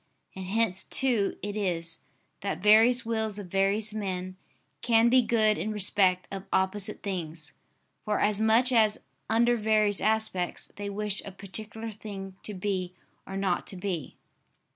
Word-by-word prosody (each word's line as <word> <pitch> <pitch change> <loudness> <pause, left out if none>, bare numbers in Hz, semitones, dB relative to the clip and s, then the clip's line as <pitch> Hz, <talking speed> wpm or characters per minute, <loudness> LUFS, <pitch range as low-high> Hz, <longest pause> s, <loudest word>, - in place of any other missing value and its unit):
And 190 -1 -6
hence 200 -2 +1
too 240 -7 +1
it 205 0 -3
is, 170 -5 -2 0.4
that 200 - -3
various 225 +4 +5
wills 220 -2 -1
of 195 -4 -8
various 200 +2 +2
men 185 -3 -4 0.5
can 230 0 +4
be 255 +1 +6
good 220 -3 +2
in 215 - -2
respect 190 -3 +2
of 195 -1 -6
opposite 195 +2 0
things, 165 -5 -4 0.5
for 210 -1 0
as 210 0 +1
much 225 +3 +4
as, 220 -3 +3 0.3
under 235 +2 +3
various 215 -2 +2
aspects, 215 -5 0
they 205 0 -5
wish 205 0 0
a 200 - -8
particular 215 +3 -6
thing 195 -3 -8
to 210 - -7
be 185 -2 -3 0.3
or 195 - -5
not 190 -3 -1
to - - -5
be. 180 -6 -4
205 Hz, 150 wpm, -28 LUFS, 190-220 Hz, 0.5 s, be